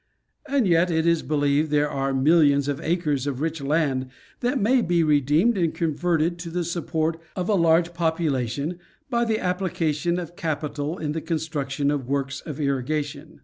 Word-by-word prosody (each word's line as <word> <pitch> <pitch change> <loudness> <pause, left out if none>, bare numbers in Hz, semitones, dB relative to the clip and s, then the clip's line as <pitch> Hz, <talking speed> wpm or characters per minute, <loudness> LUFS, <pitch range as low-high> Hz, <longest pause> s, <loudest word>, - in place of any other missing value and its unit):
And 270 -6 +2
yet, 170 +1 +3
it 160 -1 +1
is 170 -1 +3
believed 145 0 +1
there 150 0 +2
are 135 -1 -2
millions 140 0 +4
of 145 +1 -2
acres 155 -5 0
of 135 -3 -2
rich 160 0 -2
land 140 -3 0 0.3
that 250 +2 0
may 245 +5 +3
be 170 -4 +2
redeemed 155 - +3
and 165 -2 0
converted 170 +1 0
to 170 0 -6
the 175 +1 -2
support 165 -1 -2
of 180 -1 -2
a 215 - +2
large 170 -1 +3
population, 160 -2 -1 0.3
by 235 0 +2
the 220 -1 +1
application 175 -3 -1
of 175 -1 -6
capital 150 0 -3
in 150 -2 -3
the 160 +1 -3
construction 145 -4 -2
of 140 -4 -2
works 135 -1 -2
of 150 -2 -7
irrigation. 145 +2 -2
160 Hz, 170 wpm, -24 LUFS, 145-175 Hz, 0.3 s, millions